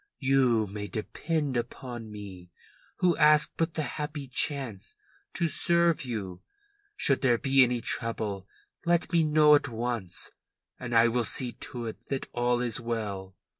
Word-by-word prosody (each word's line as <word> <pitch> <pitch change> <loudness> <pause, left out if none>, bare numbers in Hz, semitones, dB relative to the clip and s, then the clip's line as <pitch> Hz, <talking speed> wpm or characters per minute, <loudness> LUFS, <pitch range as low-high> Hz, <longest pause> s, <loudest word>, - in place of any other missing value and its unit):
You 130 -5 +3
may 105 +1 -6
depend 145 +6 -2
upon 120 -1 -5
me, 95 -4 -9 0.5
who 175 -2 +4
ask 150 0 +5
but 165 -1 -1
the 155 - 0
happy 150 -1 -5
chance 130 -5 -2 0.4
to 170 - +1
serve 170 -1 +2
you. 95 -7 -5 0.5
Should 135 - +2
there 125 -4 +3
be 135 +2 +4
any 125 -1 0
trouble, 110 -5 -2 0.4
let 170 +1 +1
me 170 - +5
know 150 -1 +5
at 145 - +4
once, 115 -5 -3 0.5
and 120 -1 -4
I 115 +1 +6
will 120 +1 +1
see 125 +2 -2
to 120 -1 -7
it 110 - -8
that 135 -1 -3
all 120 0 +1
is 120 -2 0
well. 100 -5 -4
120 Hz, 150 wpm, -28 LUFS, 110-145 Hz, 0.5 s, I